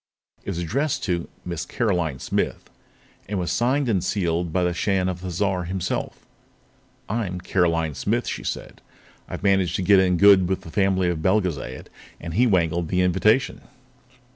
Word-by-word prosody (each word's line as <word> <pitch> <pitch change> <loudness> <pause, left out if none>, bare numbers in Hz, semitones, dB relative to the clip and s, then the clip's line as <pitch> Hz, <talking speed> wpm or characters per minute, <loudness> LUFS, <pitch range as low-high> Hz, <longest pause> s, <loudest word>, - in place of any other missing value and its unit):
It - - -6
was 95 - -3
addressed 130 - -1
to 85 -3 -2 0.2
"Miss 85 -2 -3
Caroline 90 - -1
Smith" 65 - -3 0.6
and 105 - -2
was 90 -2 -1
signed 130 +3 +1
and 95 -7 +1
sealed 85 -3 -1
by 90 +1 +1
the 90 0 +1
Shan 95 +1 0
of 90 -1 -3
Thizar 90 0 -1
himself. 90 0 -3 0.8
"I'm 100 -5 -2
'Caroline 85 -4 0
Smith'," - - -1
she - - -4
said. - - -5 0.5
"I've - - -6
managed 95 -4 +2
to 95 - -1
get 100 +1 +6
in 90 -1 +3
good 95 -2 +6
with 95 - -1
the 80 - -11
family 95 -1 +2
of 85 -2 -2
Belgezad, 90 -9 -1 0.3
and 85 -1 -6
he 125 +8 +3
wangled 85 -4 +1
the 90 +2 +1
invitation. 100 +8 +2
90 Hz, 165 wpm, -23 LUFS, 85-100 Hz, 0.8 s, get